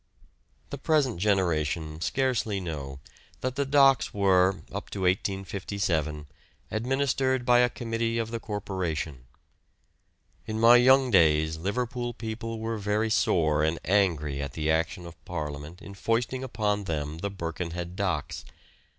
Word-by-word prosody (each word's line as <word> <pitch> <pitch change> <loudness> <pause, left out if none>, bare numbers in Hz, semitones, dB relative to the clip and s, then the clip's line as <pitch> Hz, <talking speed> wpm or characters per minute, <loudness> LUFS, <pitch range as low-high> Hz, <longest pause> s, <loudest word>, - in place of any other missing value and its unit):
The 140 - -5
present 140 - +1
generation 80 -5 0
scarcely 120 -4 0
know 70 -6 -6 0.4
that 130 0 -2
the 140 -1 -1
docks 135 -2 +4
were 95 -1 +3
up - - -6
to 100 - -5
1857 95 -4 -1 0.5
administered 130 +2 0
by 120 -1 +5
a 125 0 +4
Committee 115 -1 -2
of 115 -1 -2
the 115 - -3
Corporation. 90 - -4 1.2
In 110 0 -3
my 115 +2 +8
young 130 +1 +5
days 80 -2 +4
Liverpool 120 +6 -3
people 115 0 -5
were 110 0 -3
very 105 +2 0
sore 80 -8 +2
and 80 +1 +1
angry 80 -7 +1
at 70 -2 -5
the 80 0 0
action 80 +4 -1
of 85 -1 -12
Parliament 75 0 -6
in 100 - -9
foisting 115 +5 -1
upon 105 -5 -1
them 75 -2 -3
the 100 - -2
Birkenhead 85 -1 -5
docks. 90 -7 -2
100 Hz, 135 wpm, -27 LUFS, 80-115 Hz, 1.2 s, my